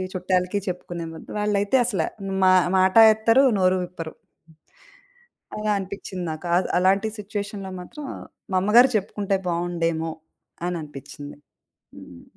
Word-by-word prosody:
చుట్టాలకి 185 Hz, +2 st, 0 dB
చెప్పుకునే 175 Hz, -1 st, -5 dB
ముందు 160 Hz, -, -11 dB
బదలు. -, -, -5 dB
వాళ్ళైతే 205 Hz, +3 st, +1 dB
అసల 200 Hz, -9 st, 0 dB, 0.4 s
మా 185 Hz, -, +6 dB, 0.3 s
మాట 185 Hz, +2 st, +3 dB, 0.2 s
ఎత్తరు 225 Hz, +5 st, +4 dB, 0.2 s
నోరు 185 Hz, 0 st, +3 dB
విప్పరు. 165 Hz, -3 st, -8 dB, 1.4 s
అలా 210 Hz, 0 st, -1 dB
అనిపించింది 190 Hz, -1 st, -6 dB
నాకు. 155 Hz, +3 st, -7 dB
అద్ 185 Hz, -, 0 dB
అలాంటి 195 Hz, +3 st, +3 dB
సిట్యుయేషన్‌లో 200 Hz, -1 st, -5 dB
మాత్రం 285 Hz, -, -9 dB, 0.5 s
మా 185 Hz, -, +2 dB
అమ్మగారు 235 Hz, +7 st, +6 dB
చెప్పుకుంటే 200 Hz, 0 st, -1 dB
బాగుండేమో 170 Hz, -1 st, -1 dB, 0.6 s
అననిపించింది. 145 Hz, -4 st, -7 dB, 0.6 s
హ్మ్. 85 Hz, -1 st, -13 dB
185 Hz, 115 wpm, -23 LUFS, 170-205 Hz, 1.4 s, మా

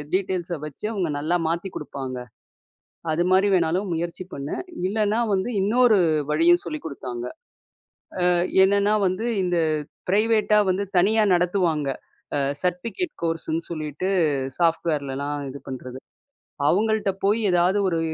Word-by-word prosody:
டீட்டெயில்ஸ 180 Hz, -3 st, -1 dB
வச்சு, 150 Hz, +6 st, -8 dB
அவுங்க 180 Hz, -7 st, -1 dB
நல்லா 160 Hz, +4 st, +1 dB
மாத்தி 170 Hz, +3 st, -2 dB
குடுப்பாங்க. 135 Hz, -3 st, -6 dB, 0.9 s
அதுமாரி 185 Hz, +5 st, +3 dB
வேணாலும் 180 Hz, +2 st, +1 dB
முயற்சி 170 Hz, +2 st, -3 dB
பண்ணு. 140 Hz, +1 st, -4 dB, 0.3 s
இல்லன்னா 215 Hz, +2 st, +1 dB
வந்து 195 Hz, +3 st, 0 dB
இன்னொரு 220 Hz, +3 st, +4 dB, 0.3 s
வழியும் 165 Hz, +3 st, +4 dB
சொல்லிக் 155 Hz, -3 st, -5 dB
கொடுத்தாங்க. 125 Hz, -5 st, -5 dB, 1.0 s
அ -, -, +4 dB, 0.3 s
என்னன்னா 200 Hz, +2 st, +3 dB
வந்து, 185 Hz, +5 st, -2 dB, 0.2 s
இந்த 180 Hz, -1 st, 0 dB, 0.5 s
ப்ரைவேட்டா 215 Hz, +1 st, +3 dB
வந்து 185 Hz, +2 st, +1 dB
தனியா 215 Hz, +5 st, +4 dB
நடத்துவாங்க. 175 Hz, -4 st, +1 dB, 0.5 s
அ -, -, +1 dB, 0.2 s
சர்டிஃபிக்கேட் 230 Hz, -, -2 dB
கோர்ஸுன்னு 165 Hz, 0 st, -1 dB
சொல்லிட்டு 155 Hz, +3 st, -3 dB, 0.5 s
சாஃப்ட்வேர்லலாம் 145 Hz, -4 st, 0 dB
இது 140 Hz, -, -8 dB
பண்றது. 130 Hz, 0 st, -7 dB, 0.7 s
அவங்கள்ட்ட 215 Hz, +3 st, +2 dB
போய் 210 Hz, +3 st, +3 dB
ஏதாவது 180 Hz, +3 st, +3 dB
ஒரு 165 Hz, -2 st, 0 dB
175 Hz, 115 wpm, -24 LUFS, 155-200 Hz, 1.0 s, இன்னொரு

